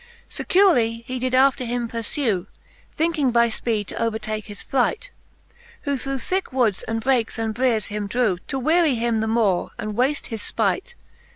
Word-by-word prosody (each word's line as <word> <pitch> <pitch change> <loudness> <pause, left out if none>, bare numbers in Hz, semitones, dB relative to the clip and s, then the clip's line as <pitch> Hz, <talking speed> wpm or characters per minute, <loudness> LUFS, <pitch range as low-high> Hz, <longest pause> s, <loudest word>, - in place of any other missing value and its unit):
XVII. - - -13
• - - -12
Securely 355 - +4
he 255 +1 -4
did 255 +1 0
after 265 0 +4
him 240 0 -2
purfew. 230 - -1 0.5
Thinking 315 -4 +2
by 235 -1 +4
fpeed 220 -2 -2
to - - -6
overtake 215 -1 -2
his 205 -1 -8
flight; 270 - 0 0.7
Who 285 -1 0
through 275 +1 -3
thicke 370 +9 -2
woods 240 -7 +1
and 225 0 -1
brakes 250 -2 +1
and 225 -1 -1
briers 235 -3 +1
him 205 0 -4
drew, 215 -4 +1
To 270 - -2
weary 310 +1 +3
him 230 -1 0
the 220 - 0
more, 220 -5 +1
and 215 - -4
v/afte 260 +6 0
his 225 -3 -5
fpight. 485 - -1
240 Hz, 180 wpm, -23 LUFS, 220-270 Hz, 0.7 s, Securely